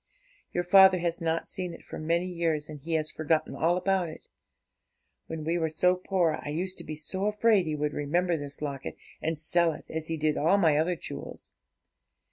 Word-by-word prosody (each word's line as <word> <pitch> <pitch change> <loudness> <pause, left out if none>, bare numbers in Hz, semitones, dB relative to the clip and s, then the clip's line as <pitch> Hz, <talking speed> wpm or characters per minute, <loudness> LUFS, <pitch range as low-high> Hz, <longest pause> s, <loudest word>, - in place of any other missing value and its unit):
Your 175 - -1
father 190 +1 +7
has 170 0 -2
not 165 0 -1
seen 180 -2 -4
it - - -15
for - - -7
many 170 +3 0
years, 165 -4 -1
and 150 -1 -8
he 165 +4 -5
has 155 -1 +1
forgotten 155 0 0
all 170 +2 +2
about 185 -2 +1
it. 155 - -12 1.0
When 160 -1 -5
we 165 +3 0
were 160 -1 0
so 180 +3 +3
poor, 180 -3 0
I - - -5
used 185 +5 -2
to - - -7
be 155 - -6
so 190 +6 -2
afraid 210 -3 +3
he 155 - -1
would 150 0 -2
remember 170 +4 0
this 145 -1 -5
locket 140 -2 -4 0.3
and 160 0 -1
sell 165 +1 +2
it, - - -11
as 160 0 -3
he 165 - -2
did 155 0 +1
all 165 +7 +3
my 160 -6 +4
other 170 +3 +1
jewels. - - -8
165 Hz, 205 wpm, -28 LUFS, 155-180 Hz, 1.0 s, father